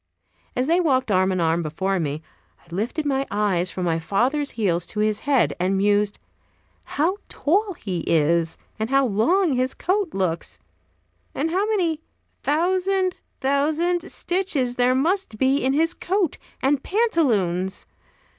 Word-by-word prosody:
As 250 - +1
they 335 +5 +3
walked 265 -9 +1
arm 190 0 +3
in 185 - -1
arm 165 0 +2
before 185 +5 -1
me, 155 -1 -3 0.4
I 170 - -14
lifted 235 - -2
my 270 -1 +1
eyes 195 -4 0
from 180 -1 -4
my 165 -1 +1
father's 255 - 0
heels 175 -6 0
to 210 - -5
his 215 0 +1
head, 270 -4 +3
and 185 +2 +1
mused: 205 +1 +2 0.8
"How 340 +7 +2
tall 390 +6 +1
he 185 - -4
is! 165 +1 +2 0.2
and 220 +1 -1
how 275 0 +3
long 270 - +2
his 255 +1 0
coat 375 -2 -1
looks! 180 -4 -2 0.8
and 315 +4 -1
how 390 +4 +1
many 345 -8 +1 0.4
thousand, 370 +4 +1 0.2
thousand 315 +6 +1
stitches 330 -10 -1
there 250 +1 +3
must 325 - 0
be 265 +4 +3
in 265 +1 +2
his 325 +4 +2
coat 370 -3 -1 0.2
and 275 0 +2
pantaloons! 220 - 0
260 Hz, 145 wpm, -23 LUFS, -, 0.8 s, they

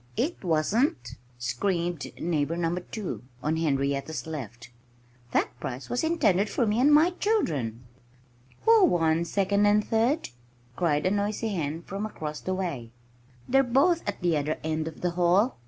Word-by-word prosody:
"It 280 +6 -1
wasn't!" 160 - +1 0.2
screamed 170 +5 -2
Neighbor 165 -1 -1
Number 175 +1 0
2 180 - -6 0.2
(on 155 +2 0
Henrietta's 140 -1 -1
left). 120 -6 -7 0.6
"That - - +2
prize 125 +2 -6
was 245 - 0
intended 215 - +2
for 240 - +1
me 215 +2 +1
and 280 +4 +5
my 310 +4 +6
children!" 150 - -1 0.8
"Who 450 -2 +6
won 165 - +2
second 200 +3 +2
and 210 +1 +3
third?" 240 +8 +1 0.5
cried 150 -4 +1
a 185 - +3
noisy 205 +2 -1
hen 165 -4 -3
from 200 +4 -4
across 155 -7 -6
the 185 - -2
way. 165 -12 -4 0.6
"They're 270 +1 +4
both 275 +7 +3
at 200 - -5
the 175 -2 +2
other 150 +2 -1
end 155 0 -1
of 160 - -8
the 180 - 0
hall!" 180 - +2
175 Hz, 155 wpm, -27 LUFS, 155-220 Hz, 0.8 s, my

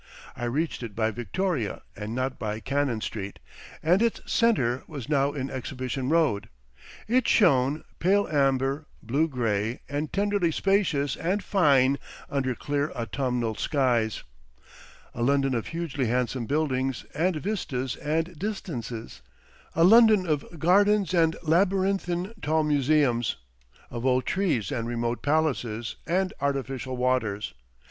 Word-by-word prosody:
I 120 - -4
reached 150 +7 -1
it 115 -4 -7
by 110 -1 +1
Victoria 120 - -2
and 105 +3 -5
not 130 +1 -2
by 110 0 -3
Cannon 135 -3 -1
Street, 100 -3 -5 0.5
and 175 +6 +4
its 230 -1 +1
centre 130 - +2
was 140 -7 -7
now 140 -1 +2
in 135 -2 -4
Exhibition 130 0 -4
Road. 155 -11 +2 0.6
It 245 +2 +2
shone, 145 - +3 0.2
pale 200 +3 +3
amber, 135 0 +1 0.2
blue 140 +8 +1
grey 115 -4 -1
and 145 +1 -3
tenderly 200 -3 +1
spacious 165 -8 +1
and 190 +5 -1
fine 140 -7 +3 0.3
under 130 -3 0
clear 145 +2 -1
autumnal 120 0 -1
skies, 120 -4 0 0.9
a 120 - -5
London 135 +1 +2
of 115 -3 -2
hugely 160 -6 -2
handsome 125 0 -1
buildings 135 -4 -1
and 175 +3 +1
vistas 145 - -2
and 160 +2 -2
distances, 125 - -5 0.5
a 165 - +4
London 215 0 +7
of 155 +1 -2
gardens 200 +4 +3
and 165 -2 +3
labyrinthine 185 +2 +1
tall 155 +1 +1
museums, 140 -6 +2 0.6
of 120 -1 -5
old 130 -1 +2
trees 165 - 0
and 115 -4 -2
remote 120 0 -2
palaces 125 -7 0
and 185 +3 +1
artificial 135 -2 -2
waters. 125 -5 0
140 Hz, 130 wpm, -26 LUFS, 120-170 Hz, 0.9 s, London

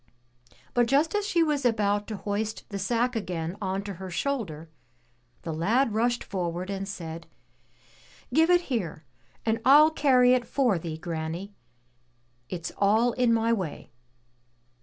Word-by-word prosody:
But 240 -1 +3
just 285 +6 +2
as 415 -1 0
she 340 -4 +3
was 300 -3 0
about 205 -3 +1
to 215 - -5
hoist 210 +2 -3
the 200 - -4
sack 240 +5 0
again 175 -5 -3
on 190 0 -2
to 200 0 -5
her 190 - -5
shoulder, 180 - -3 0.8
the 165 - -4
lad 220 - +1
rushed 240 +2 +1
forward 180 0 -3
and 195 0 -4
said: 165 -4 -7 1.1
"Give 320 +4 +4
it 355 0 +5
here, 190 - -4 0.4
and 225 0 0
I'll 300 +4 +7
carry 255 -5 +4
it 250 -2 +1
for 245 -10 +1
thee, 160 -1 -5
granny! 165 +4 -5 1.0
It's 170 -3 -5
all 220 +4 +3
in 245 0 +2
my 230 0 +2
way." 185 -9 -4
215 Hz, 145 wpm, -27 LUFS, 180-250 Hz, 1.1 s, I'll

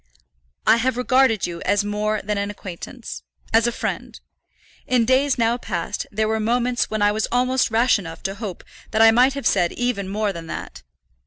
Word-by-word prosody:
"I - - +6
have 250 +1 0
regarded 250 -3 +3
you 170 -1 -6
as 205 +1 +1
more 210 +1 -1
than 205 0 -1
an 200 0 -2
acquaintance, 170 - -8 0.3
as 225 +1 +4
a - - +1
friend. - - -4 0.7
In 245 -2 +3
days 260 +3 +2
now 230 0 +2
past 195 -3 -4
there 215 +1 0
were 220 0 0
moments 240 +2 0
when 215 -1 -1
I 205 - +4
was 215 +1 -1
almost 255 +1 +2
rash 230 +1 +3
enough 165 -4 -9
to 195 - -2
hope 200 -4 -7 0.3
that 220 0 +3
I 225 - +8
might 250 +4 +4
have 280 0 -6
said 175 -3 +2
even 245 -6 -2
more 205 0 -1
than 165 -2 -8
that. 60 - -7
220 Hz, 190 wpm, -22 LUFS, 200-245 Hz, 0.7 s, I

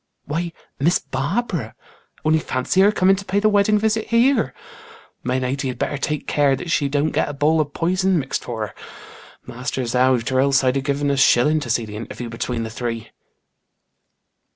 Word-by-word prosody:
"Why, 165 +3 -2 0.3
Miss 165 +6 +3
Barbara. 145 - -3 0.5
Only 155 0 +4
fancy 130 +6 0
her 205 +2 +6
coming 195 -2 +3
to 200 - -6
pay 200 +1 0
the 215 +1 +3
wedding 205 +1 +3
visit 220 +1 0
here. 230 - +3 0.7
My 125 +1 -1
lady 130 +1 -2
had 130 -1 -4
better 140 +3 -2
take 150 +1 -2
care 145 -2 +2
that 165 +5 -6
she 145 -3 +1
don't 145 +2 0
get - - 0
a - - -5
bowl 155 +3 +2
of 145 -1 -5
poison 185 +2 +1
mixed 135 -3 -2
for 110 -3 -3
her. - - -12 0.7
Master's 125 0 -4
out 125 -1 +2
or 130 - +2
else 135 0 +3
I'd 130 +1 +2
have 135 - -3
given 140 0 0
a 140 - 0
shilling 145 +3 +4
to 140 -5 -6
see 115 0 +1
the 105 -1 -8
interview 115 +1 -7
between 115 0 -3
the 110 - -5
three." 115 -1 -5
140 Hz, 190 wpm, -21 LUFS, 125-175 Hz, 0.7 s, her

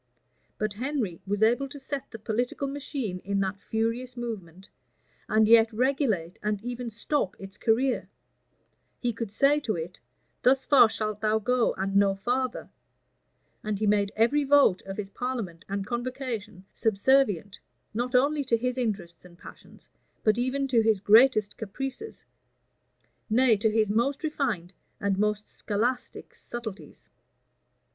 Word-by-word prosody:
But 215 -1 -2
Henry 235 - -3
was 205 +2 0
able 245 +5 +2
to 285 - -9
set 275 0 -5
the 225 - -8
political 240 +5 -2
machine 270 -8 -4
in 200 +2 -2
that 195 +1 -3
furious 230 +3 -2
movement, 195 -6 -6 0.6
and 215 0 +3
yet 225 0 +6
regulate 225 - 0
and 210 -1 -1
even 245 0 -4
stop 230 -1 -2
its 195 0 -9
career: 245 +4 +1 0.9
he 240 -2 -1
could 230 -2 -5
say 280 +7 +3
to 225 -8 -2
it, 170 +2 -6 0.4
Thus 265 +1 +3
far 260 -6 +7
shalt 215 -1 -3
thou 215 0 +2
go, 245 +2 +1
and 195 +1 -2
no 200 -1 +4
farther: 250 +5 -2 0.9
and 215 -1 -2
he 215 - -1
made 205 -1 +2
every 240 +7 +3
vote 280 -9 +4
of 195 - -6
his 200 -2 -5
parliament 230 -10 -4
and 200 0 -2
convocation 235 -4 -5
subservient, 210 -3 +2 0.3
not 245 +3 -2
only 285 +3 +3
to 235 -2 +2
his 250 +2 -2
interests 195 -8 -3
and 175 -1 -16
passions, - - -15 0.4
but 215 -1 +4
even 260 +3 -1
to 240 -3 +4
his 220 -2 +2
greatest 215 0 +5
caprices; 270 - -6 1.1
nay, 240 +1 +4
to 215 +2 +1
his 215 -1 +1
most 270 +8 0
refined 240 - -2 0.3
and 195 -1 0
most 210 0 0
scholastic 240 +5 -3
subtilties. 230 -4 -8
225 Hz, 145 wpm, -27 LUFS, 200-255 Hz, 1.1 s, far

